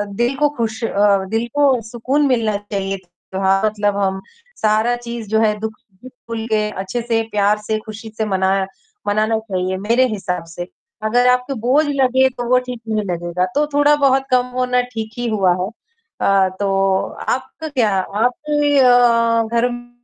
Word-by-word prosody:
दिल 240 +4 0
को 295 0 +3
खुश 225 0 -2
अ, 200 -2 +2
दिल 225 +2 -1
को 275 -5 +3
सुकून 260 +5 0
मिलना 225 -5 +1
चाहिए 195 -1 -4
त्योहार 190 +2 -1
मतलब 205 -1 0
हम 190 -1 -1 0.4
सारा 220 +3 +2
चीज़ 235 -2 -7
जो 220 +1 +2
है, 215 -1 +3
दुःख 220 0 -4 0.3
भूल 230 -3 -7
के 215 -1 +1
अच्छे 195 +5 -4
से 230 -1 0
प्यार 205 0 +2
से 220 0 +1
खुशी 220 +1 -8
से 220 - 0
मना 190 -1 +1 0.5
मनाना 215 +2 +1
चाहिए 185 -3 -3
मेरे 235 +6 +2
हिसाब 190 -6 -3
से। 175 0 -5 0.4
अगर 245 +3 +3
आपको 250 +2 +1
बोझ 255 +7 +2
लगे 265 -2 +3
तो 245 -1 -6
वो 255 - +5
ठीक 250 -2 -7
नहीं 215 -1 0
लगेगा, 175 0 -1
तो 300 +1 +3
थोड़ा 290 +1 +5
बहुत 270 -2 +3
कम 250 -1 +3
होना 250 0 +2
ठीक 220 -1 -4
ही 240 0 -2
हुआ 195 -4 +2
है - - -2 0.5
अ, 195 -1 +3
तो 195 -1 +2 0.3
आपका 320 - -3
क्या 245 -7 +1
आपके 290 +8 0
अ, 235 -2 +4
घर 240 +1 -1
225 Hz, 170 wpm, -19 LUFS, 200-250 Hz, 0.5 s, वो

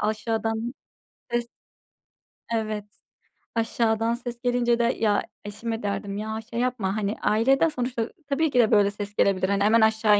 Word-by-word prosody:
aşağıdan 225 +2 -1 0.6
ses, 240 0 0 1.1
evet, 215 -2 -2 0.7
aşağıdan 225 0 +1
ses 240 0 -6
gelince 240 -1 +2
de - - +3 0.2
ya 210 -2 +2 0.2
eşime 225 +2 -4
derdim 200 0 -3
ya 220 +1 -3
şey 235 - -2
yapma, 235 -6 0
hani, 205 0 -1
ailede 265 +9 +3
sonuçta 245 -4 -2 0.2
tabii 300 +1 +1
ki 250 - +3
de 225 -2 +4
böyle 205 -2 +5
ses 205 0 -6
gelebilir. 190 -1 +2
Hani, 200 0 +2
hemen 220 +2 +5
aşağı 220 -1 +4
225 Hz, 145 wpm, -25 LUFS, 210-240 Hz, 1.1 s, böyle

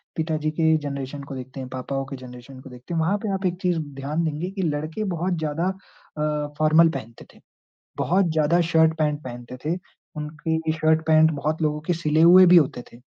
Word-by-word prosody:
पिताजी 155 -1 -1
के 160 0 +2
जनरेशन 140 0 -5
को 140 -1 -8
देखते 130 +1 -8
हैं, 130 - -6
पापाओं 135 +1 -4
के 135 - -7
जनरेशन 125 +1 -11
को 135 - -12
देखते 125 +6 -9
हैं। 165 - 0
वहाँ 180 +6 +1
पे 205 - -1
आप 190 0 -3
एक 175 0 0
चीज़ 175 -3 +1 0.2
ध्यान 150 +5 -2
देंगे 155 +4 -3
की 195 -1 -4
लड़के 155 +8 -3
बहुत 180 +3 -1
ज़्यादा 160 +3 -1
अ, 150 -5 -5
फॉर्मल 160 +2 +5
पहनते 115 -6 -8
थे, - - -20 0.6
बहुत 185 -1 +2
ज़्यादा 160 +2 +2
शर्ट 160 0 +4
पैंट 150 -1 0
पहनते 120 0 -8
थे। 165 +3 0 0.4
उनकी 160 +1 -2
शर्ट 160 0 +2
पैंट 160 0 +5
बहुत 155 +2 -2
लोगों 150 0 0
के - - +2
सिले 155 -1 0
हुए 180 +2 +8
भी 180 - +7
होते 145 -6 +3
थे 120 - -14
155 Hz, 200 wpm, -23 LUFS, 140-165 Hz, 0.6 s, हुए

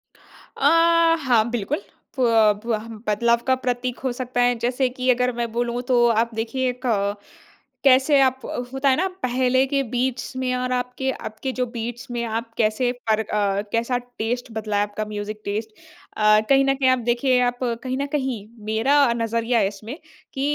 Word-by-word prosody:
अ, 280 - -3 0.6
हाँ 235 -4 +5
बिल्कुल। 220 -4 -2 0.4
प - - +3 0.4
बह 225 -1 -2 0.2
बदलाव 235 +3 +2
का 260 - +4
प्रतीक 250 -1 -3
हो 260 - 0
सकता 245 0 -2
है 245 0 +3
जैसे 250 +2 +1
कि 255 0 0
अगर 250 0 +3
मैं 235 -1 -2
बोलूँ, 240 +1 -1
तो 245 -1 +3
आप 230 +1 +1
देखिए 250 +4 -1
एक 250 +1 -7
अ, 200 -4 +1 0.7
कैसे 270 +2 +5
आप 260 -1 +1
अ, - - -5 0.2
होता 270 +1 +1
है 260 - +4
ना, 370 +4 +1 0.2
पहले 255 +1 +2
के 275 +1 +1
बीट्स 255 +1 -2
में 255 -1 -1
और 250 0 -2
आपके 250 +1 -2
अब 220 -4 -7
के 265 - -1
जो 255 0 -1
बीट्स 235 +2 -5
में 240 -1 -2
आप 230 +1 -4
कैसे 225 +2 +1 0.2
फ़र्क 220 -1 +1
अ, 200 -1 0
कैसा 235 +2 0
टेस्ट 245 0 -4
बदला 215 -2 -2
है 205 - +3
आपका 205 +1 -4
म्यूज़िक 210 0 -6
टेस्ट। 215 +2 -3 0.5
अ, 215 0 +5
कहीं 275 0 +5
ना 270 - +3
कहीं 265 -1 +2
आप 255 0 +3
देखिए 250 +2 +2
आप 245 0 -1 0.2
कहीं 255 0 -2
ना 280 - -1
कहीं, 265 -7 -3 0.2
मेरा 220 +6 +1
अ, 235 - +2
नज़रिया 230 +1 0
है 195 - +3
इसमें 210 +7 -8 0.4
कि 270 - -4
245 Hz, 190 wpm, -23 LUFS, 225-255 Hz, 0.7 s, हाँ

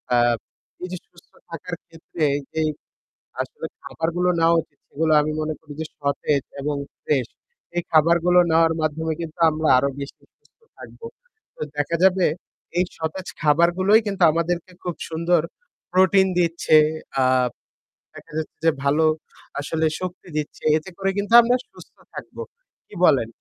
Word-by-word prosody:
আ - - +4 0.7
এই - - -3
যে 180 - -4
সুস্থ 170 - -22 0.2
থাকার 170 +2 -6
ক্ষেত্রে 165 0 -7 0.3
যেই 160 -1 +1 0.7
আসলে - - -7 0.2
খাবারগুলো 175 +2 -1
নেওয়া 165 +1 +4
উচিত, 145 - -23
সেগুলো 155 +1 0
আমি 155 +1 -2
মনে 155 0 -2
করি 150 -2 -12
যে - - -3
সতেজ 140 0 0 0.2
এবং 145 +1 -1 0.3
fresh 130 -6 0 0.4
এই 175 - +1
খাবারগুলো 170 +3 +4
নেওয়ার 165 0 +4
মাধ্যমে 160 +1 -1
কিন্তু 160 -1 -7
আমরা 155 0 -1
আরও 140 +2 +2
বেশি 140 - -8
সুস্থ - - -35 0.2
থাকব। - - -13 0.5
তো - - -13 0.2
দেখা 145 +3 0
যাবে 190 -1 +4 0.5
এই 180 - +4
সতেজ 165 +4 -4
খাবারগুলোই 175 +7 +4
কিন্তু 195 -3 0
আমাদেরকে 170 +2 -2
খুব 175 -2 -3
সুন্দর 170 +1 +2 0.5
protein 190 +1 +4
দিচ্ছে। 165 -2 +3 0.4
আ - - +4 0.9
দেখা - - -13
যাচ্ছে 160 - -5
যে 165 - +6
ভালো 150 +3 +3 0.5
আসলে 160 +2 -1
শক্তি 185 0 -6
দিচ্ছে। 150 - -5
এতে 155 - -7
করে 195 0 0
কিন্তু 205 +3 -2
আমরা 245 +2 +2 0.2
সুস্থ - - -16 0.2
থাকব। - - -10 0.5
কি - - -18
বলেন? 120 -5 +4
165 Hz, 145 wpm, -22 LUFS, 155-180 Hz, 0.9 s, যে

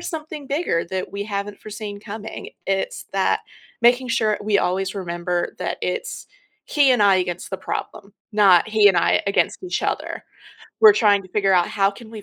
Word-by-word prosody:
something 310 -3 -6
bigger 275 - -1
that 190 -1 -3
we 200 0 -4
haven't 205 -1 -4
foreseen 210 -1 -7
coming, 220 +1 -8 0.2
it's 195 0 -2
that 195 -1 +1 0.4
making 245 +2 +4
sure 215 -3 +1
we 205 -1 +1
always 190 +2 -1
remember 175 -1 -3
that - - -3
it's - - -4 0.4
he 280 -3 +4
and 230 -4 +3
I 195 -2 +5
against 180 -1 -3
the 190 - -3
problem, 200 +2 -6 0.2
not 200 -4 +5
he 215 -1 +4
and 195 -3 +5
I - - +3
against 200 - 0
each 360 - -2
other. - - -3 0.6
We're 435 -2 +9
trying 205 - +3
to 185 - -15
figure 195 0 +2
out 175 -1 +3
how 200 -1 +1
can 225 +1 -13
we 220 -2 -9
205 Hz, 180 wpm, -22 LUFS, 190-220 Hz, 0.6 s, We're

